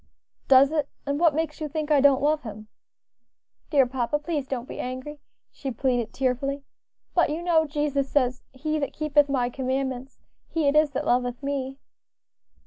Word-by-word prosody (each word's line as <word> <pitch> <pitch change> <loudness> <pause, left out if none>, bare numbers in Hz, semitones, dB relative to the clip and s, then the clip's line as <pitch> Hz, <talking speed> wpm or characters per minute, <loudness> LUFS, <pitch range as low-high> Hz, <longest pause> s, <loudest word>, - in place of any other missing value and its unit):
"Does 270 +1 +6
it? 300 -3 0 0.2
and 285 +1 -1
what 330 -4 +4
makes 315 -1 -2
you 305 - -3
think 305 +1 -3
I 290 -2 +5
don't 280 -1 +4
love 305 +1 +2
Him?" 215 -2 -9 1.0
"Dear 280 -4 +4
papa, 250 +2 -1
please 295 -3 -3
don't 255 -2 -4
be - - -8
angry," 260 +4 -5 0.3
she 275 - -6
pleaded, 245 -3 -1
tearfully, 275 +2 -1 0.5
"but 345 - +3
you 315 +3 -3
know 325 -3 +3
Jesus 290 -2 -1
says, 255 -3 +1
'He 305 +4 -2
that 280 - -3
keepeth 295 -1 +2
my 250 -3 0
commandments, 265 0 -3 0.3
he 320 -3 0
it 280 - +2
is 305 0 +5
that - - -2
loveth 245 +1 0
me.'" 270 -1 -3
280 Hz, 170 wpm, -25 LUFS, 260-300 Hz, 1.0 s, Does